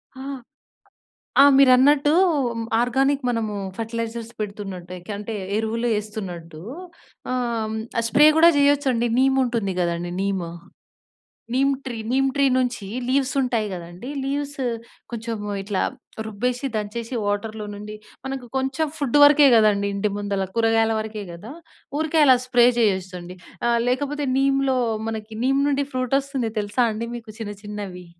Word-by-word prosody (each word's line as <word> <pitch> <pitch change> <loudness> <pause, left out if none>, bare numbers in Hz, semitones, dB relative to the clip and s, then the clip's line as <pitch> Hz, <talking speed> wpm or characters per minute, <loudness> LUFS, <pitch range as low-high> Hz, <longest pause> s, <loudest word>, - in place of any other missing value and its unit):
హా! 265 +1 -8 1.2
ఆ! - - +10
మీరన్నట్టూ 275 +2 +5 0.7
ఆర్గానిక్ 270 +3 +1
మనము 225 -3 -1 0.2
ఫెర్టిలైజర్స్ 230 0 -4
పెడుతున్నట్టు 195 -4 -6
ఏకంటే 205 +4 -6 0.2
ఎరువులు 225 +2 -1
ఏస్తున్నట్టూ 180 -7 -7 0.7
ఆహ్, 255 - 0 0.3
హ్మ్, 220 - -3 0.3
స్ప్రే 295 +6 +6
కూడా 335 +1 +8
చేయొచ్చండి 280 -4 +3
నీమ్ 265 0 +3
ఉంటుంది 230 -6 -1
కదండీ! 175 0 -1
Neem, 195 -2 -1 1.1
neem 275 +2 +3
tree. 250 -3 -5 0.2
Neem 270 +1 +3
tree 280 -1 +2
నుంచి 245 -5 -1 0.2
లీవ్స్ 270 0 +1
ఉంటాయి 235 -4 0
కదండీ! 175 +8 -8
లీవ్స్ 285 +1 -3 0.5
కొంచెం 230 0 -4 0.3
ఇట్లా 195 -1 -1 0.4
రుబ్బేసి, 245 +5 -2
దంచేసి 225 +3 -4
వాటర్‌లో 210 +1 -2
నుండి 210 +1 -8 0.3
మనకు 265 -2 -5
కొంచెం 265 +4 0
ఫుడ్ 285 -1 +2
వరకే 290 0 +7
కదండీ. 205 -2 +3
ఇంటి 205 +1 0
ముందల 200 -1 -1
కూరగాయల 225 0 +3
వరకే 215 -1 -5
కదా! 205 +9 -9 0.5
ఊరికే 315 0 +1
అలా 260 -2 +7
స్ప్రే 245 -1 +5
చేయొచ్చండి. 185 -4 -1 0.3
ఆహ్, 235 0 +2
లేకపోతే 285 +3 -1
నీమ్‌లో 270 -1 +2 0.3
మనకి 220 0 -6
నీమ్ 270 +1 +2
నుండి 285 0 +1
ఫ్రూటొస్తుంది 260 -1 -1
తెలుసా 205 +4 0
అండి 230 +2 -4
మీకు 225 -2 -10
చిన్న 205 -2 -5
చిన్నవి? 200 -4 -7
230 Hz, 130 wpm, -23 LUFS, 205-270 Hz, 1.2 s, ఆ